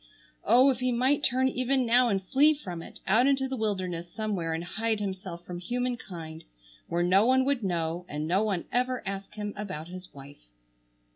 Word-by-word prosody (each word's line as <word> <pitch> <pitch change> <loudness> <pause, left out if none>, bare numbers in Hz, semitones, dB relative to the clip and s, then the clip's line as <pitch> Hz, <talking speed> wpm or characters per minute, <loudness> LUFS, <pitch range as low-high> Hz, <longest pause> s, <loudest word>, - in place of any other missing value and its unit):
Oh, 250 +6 +6
if 250 - -3
he 255 0 +1
might 260 +4 +2
turn 260 +1 +3
even 255 0 +1
now 240 +1 +5
and 195 -3 0
flee 295 +9 +4
from 180 - -7
it, - - -11
out 230 +7 +4
into 270 -1 +2
the 265 - -3
wilderness 185 -6 -2
somewhere 200 -7 -2
and 165 +1 -2
hide 220 +4 -1
himself 190 -3 -5
from 175 -1 -6
human 245 +6 -2
kind, 165 -7 -9 0.4
where 170 +1 0
no 185 +3 +4
one 260 +2 +3
would 275 -4 0
know, 175 -1 -2
and 150 +1 -3
no 185 +4 +2
one 200 -5 -1
ever 250 +1 0
ask 195 +1 -5
him 210 -1 -4
about 185 -6 -6
his 180 0 -9
wife! 140 - -14
205 Hz, 195 wpm, -28 LUFS, 175-250 Hz, 0.4 s, Oh